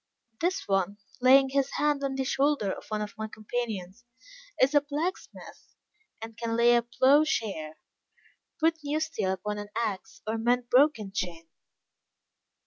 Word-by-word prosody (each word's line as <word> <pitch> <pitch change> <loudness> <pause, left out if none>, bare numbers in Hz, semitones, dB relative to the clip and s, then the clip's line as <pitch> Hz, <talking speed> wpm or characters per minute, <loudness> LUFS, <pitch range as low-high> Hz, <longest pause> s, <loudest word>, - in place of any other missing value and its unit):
This 365 +3 -1
one," 195 0 0 0.2
laying 265 +1 +6
his 275 0 0
hand 295 -1 +1
on 270 -1 -1
the 265 - -1
shoulder 270 -6 +1
of - - -8
one 215 -1 -1
of 210 - -7
my 220 - -3
companions, 215 -2 -5 0.6
"is 270 +3 +4
a 290 - +5
blacksmith; 300 +5 -6 0.4
and 225 0 -8
can 230 0 -3
lay 240 +1 +5
a 240 - +4
ploughshare; 235 - +1 0.8
put 325 0 +2
new 295 +2 -1
steel 315 -12 -1
upon 210 +2 -4
an 205 0 -7
axe; 215 -5 -4
or 220 +1 -2
mend 245 +2 +2
a - - -39
broken 250 -7 +3
chain." 175 -5 -4
235 Hz, 150 wpm, -28 LUFS, 210-280 Hz, 0.8 s, laying